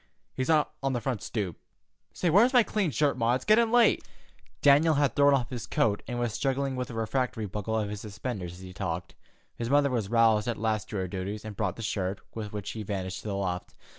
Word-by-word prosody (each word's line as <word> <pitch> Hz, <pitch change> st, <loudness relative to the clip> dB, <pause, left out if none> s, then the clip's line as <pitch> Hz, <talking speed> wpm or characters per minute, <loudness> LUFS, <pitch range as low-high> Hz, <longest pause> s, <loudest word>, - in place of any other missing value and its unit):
He's 130 Hz, +2 st, -2 dB
on 155 Hz, -2 st, +5 dB, 0.3 s
the 120 Hz, -, 0 dB
front 120 Hz, -3 st, -2 dB
stoop. 100 Hz, -8 st, -3 dB, 0.5 s
Say, 175 Hz, -, 0 dB
where 200 Hz, +7 st, +7 dB
is 255 Hz, +2 st, +2 dB
my 245 Hz, -2 st, +7 dB
clean 210 Hz, -5 st, 0 dB
shirt, 145 Hz, +2 st, +1 dB
Ma? 115 Hz, +2 st, +3 dB
It's 130 Hz, -, -4 dB
gettin' 220 Hz, +1 st, +4 dB
late." 240 Hz, -1 st, +4 dB, 0.6 s
Daniel 150 Hz, +3 st, +6 dB
had 140 Hz, -4 st, +2 dB
thrown 140 Hz, 0 st, +5 dB
off 125 Hz, -5 st, -2 dB
his 120 Hz, -3 st, -5 dB
coat 105 Hz, -2 st, +1 dB
and 120 Hz, -, -3 dB
was 120 Hz, -3 st, -1 dB
struggling 135 Hz, +1 st, -1 dB
with 125 Hz, 0 st, -3 dB
a 120 Hz, -, -7 dB
refractory 115 Hz, 0 st, -1 dB
buckle 105 Hz, +2 st, -3 dB
of 105 Hz, -2 st, 0 dB
his 105 Hz, -1 st, -5 dB
suspenders 100 Hz, -4 st, -5 dB
as 90 Hz, -, -12 dB
he 95 Hz, -1 st, -9 dB
talked. 90 Hz, -2 st, -4 dB, 0.4 s
His 115 Hz, 0 st, -4 dB
mother 140 Hz, 0 st, +4 dB
was 115 Hz, -6 st, -1 dB
roused 115 Hz, -2 st, +4 dB
at 120 Hz, -, -1 dB
last 110 Hz, -1 st, -1 dB
to -, -, -6 dB
her 95 Hz, -1 st, -1 dB
duties, 100 Hz, +3 st, -5 dB
and 105 Hz, -1 st, -6 dB
brought 95 Hz, -3 st, -1 dB
the 115 Hz, -, -7 dB
shirt, 95 Hz, -3 st, -2 dB
with 105 Hz, -2 st, -5 dB
which 105 Hz, -2 st, -5 dB
he 110 Hz, -, -6 dB
vanished 95 Hz, -3 st, -4 dB
to -, -, -8 dB
the 100 Hz, -, -2 dB
loft. 90 Hz, -2 st, -3 dB
115 Hz, 230 wpm, -28 LUFS, 100-135 Hz, 0.6 s, where